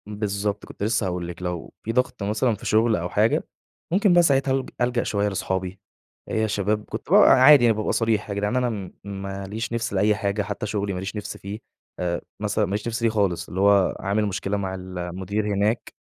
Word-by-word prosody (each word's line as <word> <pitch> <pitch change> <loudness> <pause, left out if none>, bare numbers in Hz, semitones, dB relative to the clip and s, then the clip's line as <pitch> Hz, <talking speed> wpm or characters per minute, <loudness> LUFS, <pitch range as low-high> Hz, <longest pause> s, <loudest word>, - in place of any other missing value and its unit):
بالضبط، 105 -1 -2
كنت - - -8
لسه 110 -1 +1
هاقول 90 -1 -3
لكِ 90 +1 -8
لو 90 -2 -4
في 115 - -2
ضغط 125 -3 0
مثلًا 110 +3 +1
في 105 - -12
شغل 110 +1 +3
أو 90 -1 -3
حاجة، 110 +4 +2 0.5
ممكن 195 0 +4
بقى 175 0 +6
ساعتها 135 -3 +2
ألـج 135 0 -1
ألجأ 120 0 +1
شوية 100 0 0
لأصحابي. 95 -1 -3 0.5
إيه 110 - 0
يا 110 - +1
شباب 105 +1 -1
كنت 110 +5 -7
ب - - +4
عادي 140 -8 +8
يعني 115 -2 +3
بابقى 110 - -1
صريح، 110 -2 0
يا 100 - -3
جدعان 105 +3 -1
أنا 125 -1 +2
م 100 -5 -5
ما 100 0 -6
ليش 110 +4 -4
نفس 115 -2 -2
لأي 105 +2 +3
حاجة 100 0 -1
حتى 105 +1 -4
شغلي 100 -1 -2
ما 90 - -3
ليش 95 +3 -5
نفس 105 - -5
فيه. 100 +2 -7 0.4
آآ، 85 -1 -1 0.2
مثلًا 105 0 0
ما 95 - -6
ليش 105 +3 -2
نفس 115 0 -3
ليه 115 - +4
خالص، 95 -6 0
اللي 95 - -2
هو 100 -2 +4
عامل 100 +2 0
مشكلة 100 0 -2
مع 95 -1 -3
المدير 95 +3 -4
هناك. 105 +3 0
105 Hz, 215 wpm, -24 LUFS, 95-110 Hz, 0.5 s, عادي